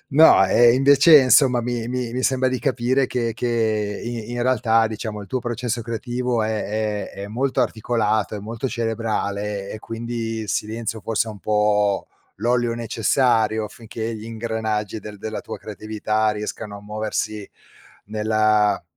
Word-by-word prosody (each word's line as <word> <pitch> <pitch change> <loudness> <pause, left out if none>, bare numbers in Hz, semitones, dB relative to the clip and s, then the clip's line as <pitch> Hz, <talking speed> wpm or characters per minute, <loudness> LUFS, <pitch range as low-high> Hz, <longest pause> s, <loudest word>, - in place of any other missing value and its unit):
No, 155 -9 +7
ehm, 120 +5 +5
invece, 140 +3 +7
insomma, 130 -1 +5
mi 120 -1 -3
mi 125 -1 -3
mi 130 +1 -2
sembra 130 -1 +2
di 130 -1 -1
capire 130 -1 +1
che 120 -3 -1
che 110 -3 -1
i 120 -1 -5
in 120 - -2
realtà, 115 -3 +3
diciamo, 110 -1 -5
il 100 - -9
tuo 130 - -1
processo 120 -1 -3
creativo 120 +1 -2
è 110 -1 -2
è 100 - -8
è - - -5
molto 130 +4 -1
articolato, 110 -2 0
è 105 - -5
molto 115 +5 -4
cerebrale 105 -4 -2
e - - -6
quindi 115 0 -4
il 110 - -7
silenzio 110 +2 -3
forse 115 +1 -1
è - - -4
un 105 - -10
po' 105 -1 +1 0.3
l'olio 120 +2 +1
necessario 115 -1 +1
affinché 115 +1 -6
gli 110 - -9
ingranaggi 110 -2 -3
del 105 0 -9
della 110 +1 -5
tua - - -7
creatività 110 +1 -1
riescano 105 0 -6
a 100 - -14
muoversi 105 0 -3 0.6
nella 110 -1 +2
110 Hz, 155 wpm, -22 LUFS, 105-120 Hz, 0.6 s, No